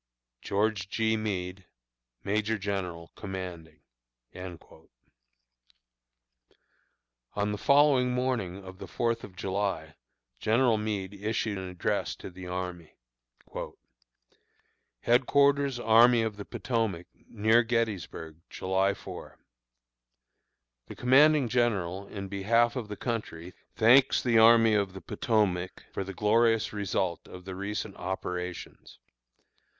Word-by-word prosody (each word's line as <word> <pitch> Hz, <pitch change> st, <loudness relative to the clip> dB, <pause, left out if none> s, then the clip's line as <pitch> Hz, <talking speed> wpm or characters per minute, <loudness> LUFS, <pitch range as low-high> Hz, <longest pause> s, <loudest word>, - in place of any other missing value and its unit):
GEORGE 100 Hz, -2 st, -1 dB
G. 110 Hz, +1 st, +1 dB
MEADE, 95 Hz, -3 st, -3 dB, 0.6 s
Major 110 Hz, +2 st, 0 dB
General 95 Hz, -4 st, -4 dB
Commanding. 90 Hz, -6 st, -7 dB, 0.5 s
On 90 Hz, -2 st, -10 dB, 2.7 s
the 140 Hz, +5 st, +4 dB
morning 125 Hz, -7 st, -2 dB
of 95 Hz, 0 st, -11 dB
the -, -, -8 dB
Fourth 115 Hz, -1 st, -1 dB
of 95 Hz, -, -10 dB
July, 95 Hz, -5 st, -2 dB, 0.5 s
General 115 Hz, 0 st, +2 dB
Meade 105 Hz, -3 st, -3 dB
issued 105 Hz, 0 st, -2 dB
an 95 Hz, -, -6 dB
address 90 Hz, -1 st, -2 dB
to -, -, -10 dB
the 90 Hz, 0 st, -10 dB
army: 90 Hz, -2 st, -5 dB, 2.1 s
HEADQUARTERS 140 Hz, +2 st, +3 dB
ARMY 115 Hz, +1 st, +5 dB
OF 110 Hz, -2 st, -2 dB
THE 100 Hz, -, -7 dB
POTOMAC, 110 Hz, -8 st, -2 dB, 0.2 s
Near 110 Hz, +2 st, +3 dB
Gettysburg, 110 Hz, -9 st, -3 dB
July 95 Hz, +1 st, 0 dB
4. -, -, -10 dB, 1.5 s
The -, -, -9 dB
commanding 140 Hz, +2 st, +5 dB
general, 100 Hz, -6 st, 0 dB
in 100 Hz, -1 st, -6 dB
behalf 115 Hz, +5 st, +2 dB
of 120 Hz, -5 st, -4 dB
the 105 Hz, -1 st, -7 dB
country, 90 Hz, -7 st, -4 dB, 0.2 s
thanks 125 Hz, +5 st, +5 dB
the 115 Hz, -3 st, +4 dB
Army 115 Hz, 0 st, +6 dB
of 100 Hz, -3 st, +1 dB
the 95 Hz, -, -9 dB
Potomac 95 Hz, -4 st, -1 dB
for -, -, -2 dB
the 95 Hz, 0 st, -8 dB
glorious 115 Hz, +2 st, +2 dB
result 95 Hz, -4 st, -2 dB
of 90 Hz, 0 st, -11 dB
the 95 Hz, -, -6 dB
recent 100 Hz, +2 st, -4 dB
operations. 90 Hz, -1 st, -5 dB
105 Hz, 105 wpm, -28 LUFS, 95-115 Hz, 2.7 s, Army